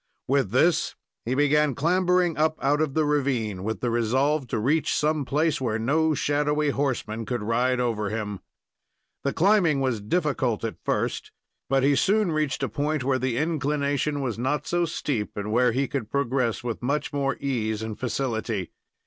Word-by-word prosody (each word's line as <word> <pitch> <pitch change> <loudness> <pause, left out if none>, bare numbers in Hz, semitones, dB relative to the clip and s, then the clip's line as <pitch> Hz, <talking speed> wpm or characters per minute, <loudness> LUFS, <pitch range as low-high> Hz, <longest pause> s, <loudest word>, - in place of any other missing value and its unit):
With 135 -5 +2
this, 155 - +2 0.3
he 125 +3 0
began 145 0 +3
clambering 180 +2 +2
up 155 +1 +1
out 145 +2 +2
of 150 -3 -1
the 155 -1 +2
ravine, 130 -10 0
with 110 +2 -3
the 120 - 0
resolve 130 +5 +1
to - - -2
reach 145 +9 +1
some 150 -1 +1
place 150 +2 0
where 110 -4 0
no 155 +7 +1
shadowy 150 +1 +1
horseman 125 -5 -2
could 120 -1 -3
ride 125 +3 +1
over 110 -4 -1
him. 105 -2 -4 0.8
The 140 - +1
climbing 175 -5 +3
was 130 -5 0
difficult 130 - 0
at 115 - -5
first, - - -2 0.4
but 135 0 +2
he 140 +1 +4
soon 205 +4 +2
reached 155 -3 -1
a - - +1
point 145 +5 -1
where 130 0 +1
the 130 -2 -1
inclination 145 -2 0
was 120 -5 -3
not 130 +4 -1
so 175 0 +1
steep, 135 -10 -3
and 105 +1 -3
where 125 +2 +3
he 135 +3 0
could 125 -6 -4
progress 130 -4 0
with 120 -2 -4
much 145 +5 -1
more 140 -1 0
ease 110 -6 -2
and 110 -1 -6
facility. 115 -7 -2
135 Hz, 175 wpm, -25 LUFS, 115-150 Hz, 0.8 s, he